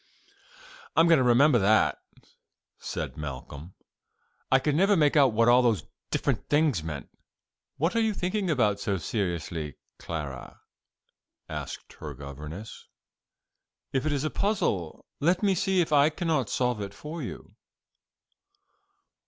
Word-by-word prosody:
"I - - +6
am 165 - +5
going 165 -3 +6
to - - +3
remember 125 +2 +5
that," 110 +2 +3 0.8
said - - -5
Malcolm; 75 +3 -7 0.8
"I 130 - +7
could 145 +3 0
never 195 +6 +4
make 150 -2 +3
out 140 -4 +6
what 115 +1 +3
all 120 +1 +6
those 115 -5 +2 0.3
different - - -1
things 145 - +2
meant." 75 -3 -6 0.7
"What 165 +8 0
are - - +3
you 220 -1 +2
thinking 185 +1 -1
about 105 -9 +2
so 100 -1 -1
seriously, 85 - -3 0.2
Clara?" 75 -6 -6 0.9
asked - - -7
her 75 -2 -7
governess. 75 - -9 1.1
"If 135 +3 0
it - - +1
is 145 -1 -1
a 155 - -1
puzzle, 145 - -1
let 175 +6 +2
me 200 -1 +4
see 190 0 +2
if 160 - -1
I 145 +1 +6
cannot 160 - -1
solve 125 -4 0
it 100 0 -6
for 155 +8 -7
you." 125 - -8
125 Hz, 140 wpm, -27 LUFS, -, 1.1 s, I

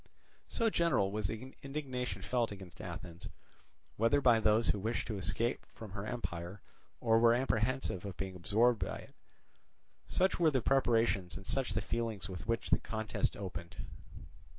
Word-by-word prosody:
So 230 -2 +1
general 135 - +2
was 105 -2 -1
the 115 +5 -6
indignation 130 -8 -4
felt 120 0 +1
against 95 -4 -9
Athens, 85 -1 -7 0.7
whether 115 +6 +4
by 120 -5 +5
those 110 +1 +3
who 105 - +2
wished 110 +4 -1
to 105 -3 -2
escape 100 +7 -1
from 110 -3 -9
her 100 +2 -5
empire, 95 -5 -4 0.4
or 115 -1 +4
were 115 0 +6
apprehensive 120 -5 0
of 100 -4 -6
being 95 -1 -4
absorbed 110 +6 +3
by - - -3
it. - - -13 0.9
Such 185 0 +2
were 165 -2 +5
the 135 -3 +2
preparations 115 -9 +2
and 95 - -10
such 130 -3 0
the 95 - +1
feelings 115 -6 -2
with 95 +2 -7
which 115 0 -1
the - - +5
contest 110 -1 -2
opened. 85 -3 -6
110 Hz, 160 wpm, -34 LUFS, 95-125 Hz, 0.9 s, were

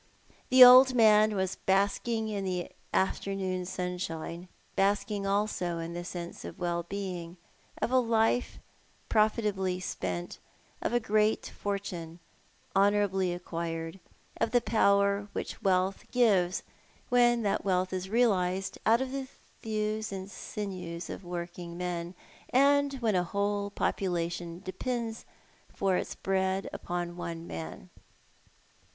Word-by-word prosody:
The 255 0 +10
old 255 +1 +9
man 215 -2 +5
was 190 -1 -1
basking 205 +4 +1
in 205 -2 -3
the 180 -2 -3 0.2
afternoon 190 -1 -1
sun 180 -1 -3
shine, 170 +1 -5 0.3
basking 200 0 +1
also 195 -4 0
in 165 +1 -5
the 175 0 -4
sense 175 -1 -7
of - - -8
well 175 -2 -1
being, 180 -2 -5 0.4
of - - -1
a 260 - +5
life 230 0 +1 0.5
profitably 210 -4 +1
spent, 90 - -4 0.4
of - - -1
a 240 - +3
great 215 -1 +1
fortune 185 -5 -4 0.6
honourably 195 -2 +3
acquired, 165 0 -4 0.4
of - - +1
the 245 +1 +4
power 200 -3 +2
which - - -5
wealth 190 0 +1
gives 195 -7 +2 0.5
when 240 -1 +4
that 200 - 0
wealth 185 -1 0
is 185 0 -3
realised 195 -5 +1
out 230 +3 +5
of 265 -1 -3
the 270 -1 -4 0.3
thews 215 -1 -2
and 195 0 -6
sinews 180 -6 -6
of - - -7
working 175 -1 -6
men, 175 0 -4 0.3
and 280 +1 +4
when 225 -2 +2
a 180 -1 +2
whole 200 +2 -1
population 175 -3 -2
depends 230 +3 -4 0.5
for 195 -1 +1
its - - -2
bread 190 0 0
upon 175 0 -4
one 170 -1 -5
man. 80 - -7
195 Hz, 125 wpm, -30 LUFS, 175-215 Hz, 0.6 s, The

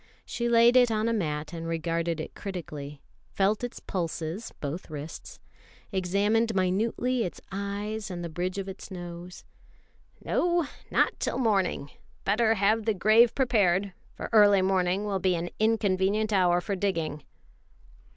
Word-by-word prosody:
She 235 0 -2
laid 235 +1 +6
it 250 -1 +6
on 220 0 0
a 230 - +1
mat 155 -7 -2
and 165 -1 -5
regarded 165 0 -1
it 155 - -6
critically, 150 -7 -7 0.3
felt 205 +4 +1
its 245 - -5
pulses 170 +2 -4
(both 155 +6 -5
wrists), 150 +1 -8 0.5
examined 205 +4 +1
minutely 225 +6 +1
its 180 - -5
eyes 200 +2 -4
and 175 -2 -5
the - - -3
bridge 180 +3 -3
of 195 -1 -3
its 190 0 -8
nose: 175 -1 -8 0.8
"No, 345 -2 +1 0.2
not - - +1
till - - -1
morning. 200 - 0 0.3
Better 220 +2 +3
have 210 +2 +2
the 220 -2 +1
grave 215 +5 +5
prepared, 200 -7 +2 0.2
for - - -5
early 205 -3 +6
morning 190 +1 +1
will 200 -2 -1
be 185 -1 +2
an 170 +1 -4
inconvenient 215 -1 +1
hour 180 -2 +3
for 200 - -2
digging." 165 -6 -2
195 Hz, 145 wpm, -27 LUFS, 175-220 Hz, 0.8 s, laid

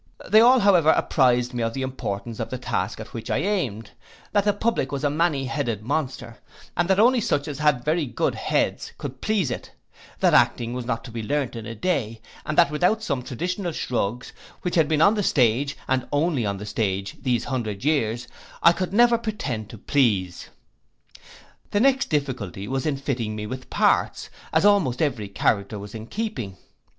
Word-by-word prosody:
They 215 - +6
all, 250 +2 +6
however, 180 -6 +5
apprized 125 -5 +3
me 120 - -2
of 115 0 -1
the 135 - -2
importance 115 -4 -4
of - - -3
the 130 - -4
task 125 - -2
at - - -9
which - - -6
I - - +1
aimed; 135 - -2 0.4
that 205 -1 +2
the 205 - +4
public 205 - -1
was 140 0 -3
a 145 - +2
many 150 -3 +1
headed 120 -6 -2
monster, 125 -4 -3 0.4
and 175 +2 0
that 190 0 +3
only 245 +2 +5
such 165 -10 0
as 145 -2 -5
had 150 -5 +2
very 155 -1 +1
good - - -1
heads - - -1
could 135 -2 -7
please 200 - 0
it: - - -6 0.5
that - - +3
acting 120 0 +3
was 125 -1 -5
not 115 -2 -2
to 125 - -9
be 115 0 -4
learnt 140 +2 -1
in 115 -1 -6
a 115 - -6
day; 115 - -1 0.3
and 155 - -2
that 170 -4 +5
without 180 +8 +1
some 140 -10 -1
traditional 175 - -3
shrugs, 120 -3 -2 0.3
which 180 - -2
had 160 -3 +3
been 155 0 +3
on 200 - +6
the 210 - 0
stage, 135 - +2
and 130 -1 0
only 145 -6 +1
on 100 0 -2
the 105 - -7
stage, 100 -2 -2
these 125 -3 0
hundred 115 -4 -3
years, 120 -6 0 0.4
I 170 - +8
could 185 +1 -3
never 235 +1 +5
pretend 125 - -4
to 115 - -9
please. 105 -7 0 1.2
The 205 - +1
next 265 +3 +3
difficulty 125 - -2
was 135 +2 -2
in 145 -3 0
fitting 120 -6 -3
me 105 0 -4
with 130 +4 -7
parts, - - +1 0.2
as - - +3
almost 185 -12 +3
every 125 -9 0
character 100 +1 0
was 100 0 -9
in 110 0 -7
keeping. 195 - -4
135 Hz, 195 wpm, -24 LUFS, 115-170 Hz, 1.2 s, I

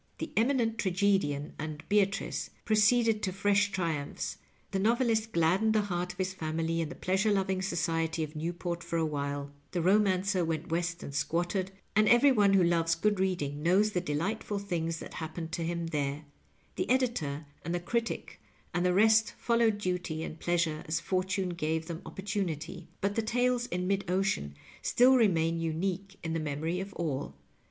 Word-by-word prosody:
The - - -5
Eminent 230 -1 +2
Tragedian 185 -7 +1
and 155 0 -5
Beatrice 200 -1 +1 0.2
pro 215 - +2
ceeded 220 0 +4
to 190 - -1
fresh 200 +1 +2
triumphs; 165 -7 -3 0.3
the 195 - 0
Kovelist 225 +1 +2
gladdened 185 +6 +3
the 215 - +4
heart 175 +1 -1
of - - -15
his 185 0 -1
family 165 -1 -1
and 160 - -2
the 175 - -8
pleasure 195 +4 +1
loving 190 -1 +1
society 165 -3 -1
of 155 0 -7
Newport 170 +2 -3
for 170 - -2
a 165 - +2
while; 140 -1 -3 0.2
the 175 - 0
Romancer 190 -1 +3
went 165 -1 -2
West 170 0 -1
and 140 - -7
squatted, 175 +5 0 0.3
and 215 +1 +5
every 240 +4 +6
one 205 -5 +4
who 190 -2 +5
loves 170 -1 +2
good 205 +3 +1
reading 150 -7 -1
knows 190 +6 +3
the 180 - 0
delightful 185 +7 -2
things 170 -5 -2
that - - -9
happened 160 0 -5
to 170 0 -2
him 170 0 -2
there; 150 -2 -2 0.5
the - - -1
Editor 225 - 0 0.2
and 170 - -2
the - - 0
Critic 235 +6 -3 0.3
and 175 - +1
the 180 0 +2
rest 220 +2 +4
followed 230 -3 +2
duty 180 -5 -2
and 160 - -7
pleasure 170 -3 0
as 155 +1 0
fortune 190 0 -1
gave 160 -1 -2
them 165 0 -6
opportunity: 190 -4 -4
but 200 +1 +1
the 225 - +1
Tales 245 +2 +1
in 180 +1 -2
Mid 195 0 -1
Ocean 180 - 0 0.3
still 255 +2 +5
remain 165 -8 +3
unique 185 +4 -2
in 165 -1 -2
the 165 - 0
memory 155 +3 -2
of 195 +1 -5
all. 135 - -3
180 Hz, 175 wpm, -30 LUFS, 165-205 Hz, 0.5 s, every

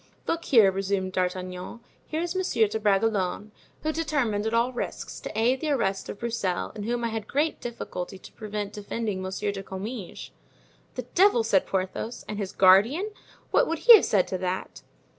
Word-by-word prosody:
"Look 335 0 -2
here," 220 -8 +6
resumed 195 0 -1
D'Artagnan; 185 +3 -3 0.3
"here 315 +1 -2
is 345 0 -2
Monsieur 365 -12 +2
de 220 - -3
Bragelonne, 205 -1 +1 0.3
who 310 - +1
determined 275 -10 -1
at 220 - -2
all 240 +2 +2
risks 245 - -5
to 215 - -5
aid 250 +4 +2
the 310 - -1
arrest 195 -9 0
of - - -5
Broussel 225 -6 -2
and 205 -2 -6
whom 240 +1 -1
I 235 - 0
had 220 -1 -4
great 300 +3 0
difficulty 195 -6 -6
to - - -14
prevent 210 -2 -5
defending 210 -1 -3
Monsieur 190 +2 -2
de 195 -1 -6
Comminges." 195 +1 -7 0.6
"The 250 - -4
devil!" 365 - +5
said 200 -4 +2
Porthos; 190 +5 -3
"and 210 -1 -5
his 195 -2 -3
guardian, 220 - +4 0.4
what - - +4
would 330 - -1
he 480 - +12
have 430 - +4
said 195 -4 +2
to 185 - -2
that?" 185 0 -4
215 Hz, 180 wpm, -26 LUFS, 190-245 Hz, 0.6 s, he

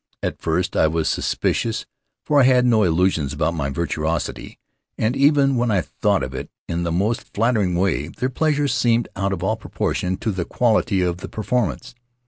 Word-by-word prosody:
At - - -3
first - - -1
I - - +4
was 80 0 -1
suspicious, 115 -1 -1 0.4
for 145 -2 +4
I - - +5
had 125 -1 +4
no 115 -3 +4
illusions 85 -6 +1
about 75 +3 0
my 70 -5 -2
virtuosity, 80 +1 -3 0.4
and 110 +4 0
even 140 -1 +4
when 120 0 +1
I 100 -4 +2
thought - - 0
of 65 0 -5
it 65 - -6 0.2
in 85 0 -2
the 85 -1 -1
most 105 +9 0
flattering 105 -5 +1
way 85 -5 0
their 125 +9 -3
pleasure 145 +1 +1
seemed 120 -3 +1
out 95 +1 -1
of 95 -2 -3
all 110 +3 0
proportion 95 -3 -2
to 110 - -2
the 95 -3 -2
quality 110 -2 +1
of 90 -1 -1
the - - -8
performance. 115 0 -2
100 Hz, 185 wpm, -21 LUFS, 85-120 Hz, 0.4 s, I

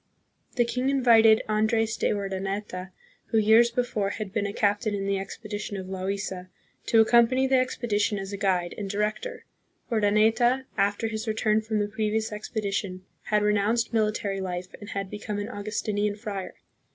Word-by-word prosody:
The 240 -2 +3
king 250 +3 -1
invited 230 -5 +5
Andre's 220 +1 +1
de - - 0
Urdaneta, 195 -1 -3 0.4
who 225 - 0
years 220 +2 +6
before 235 -4 -1
had 205 -1 -5
been 210 -2 0
a - - -3
captain 205 +1 0
in 195 -1 -3
the 200 0 0
expedition 205 +1 -6
of 190 - -5
Loaisa, 190 -1 -4 0.4
to 225 -1 +5
accom 235 0 +6
pany 265 +1 +2
the 265 -1 +4
expedition 220 -4 0
as 195 +1 -6
a - - -3
guide 180 -3 0
and 200 -2 -4
director. 215 - -3 0.5
Urdaneta, 225 +4 +3
after 200 +2 +1
his 220 0 -4
return 215 0 +1
from 220 0 -2
the 205 0 +1
previous 220 +1 -1
expedition, 200 -3 -3 0.2
had 210 -1 +1
re 210 0 +3
nounced 225 +4 +1
military 210 -3 0
life 180 -1 -5
and 205 - -9
had 195 -1 -4
become 210 0 -4
an 205 +2 -4
Augustinian 210 -1 -2
friar. 205 -3 -6
210 Hz, 165 wpm, -26 LUFS, 200-225 Hz, 0.5 s, years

